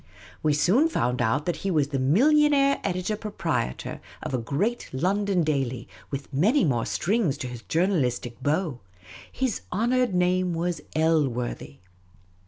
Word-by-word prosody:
We 150 - +2
soon 205 - +3
found 125 - 0
out 115 +7 +1
that 175 -2 -1
he 195 - -3
was 150 -6 +1
the 135 -2 -1
millionaire 275 - +4
editor 185 +4 -1
proprietor 205 - -3 0.2
of - - -4
a 130 - +1
great 190 - -2
London 190 +5 +1
daily, 135 -5 -1 0.2
with 140 +1 -6
many 220 - +3
more 120 -6 0
strings 190 - 0
to 130 - -5
his 120 -2 -8
journalistic 125 - -1
bow; 150 -2 0 0.5
his 260 -5 -2
honoured 240 +2 +1
name 180 0 +1
was 170 +1 -2
Elworthy. 135 - 0
165 Hz, 140 wpm, -26 LUFS, 135-205 Hz, 0.5 s, millionaire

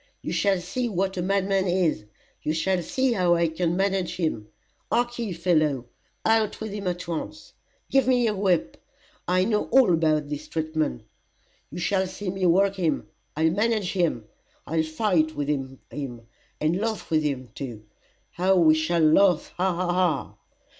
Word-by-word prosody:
You - - -3
shall 195 -2 +2
see 235 +8 -3
what 190 -1 -1
a - - 0
madman 195 +1 +1
is 175 - +1 0.4
you 155 - -1
shall 180 +3 +1
see 260 +9 0
how 180 -4 +3
I 170 0 +2
can 170 +2 -1
manage 195 -2 0
him. 155 - -2 0.4
Hark 240 0 0
ye, 225 -4 -2
fellow, 155 -7 +1 0.4
out 220 -1 +2
with 220 -1 -5
him 200 -2 -4
at 175 -1 -3
once. 165 -2 -6 0.3
Give 270 -2 +2
me 250 -2 +3
your 215 - +1
whip 190 -4 0 0.5
I 185 +1 +2
know 210 -1 +1
all 260 -9 +4
about 155 -2 +2
his 145 - -5
treatment. 155 - -2 0.7
You - - -9
shall 190 +2 0
see 185 0 -5
me 190 -1 0
work 195 +3 +3
him. 170 -4 -1 0.3
I'll 160 +1 +3
manage 210 0 0
him, 170 - 0 0.4
I'll 160 +1 0
fight 155 -1 0
with 145 -1 -2
him, 135 -2 -2
and 140 - -4
laugh 220 -6 -3
with 155 -1 +3
him 135 -4 -3
too 120 -7 -7 0.5
how 190 +2 +2
we 165 -4 +6
shall 155 +2 +1
laugh 175 +2 +4
Ha! 185 +1 +2
Ha! 175 0 -1
Ha!" 175 -7 0
180 Hz, 165 wpm, -25 LUFS, 155-195 Hz, 0.7 s, we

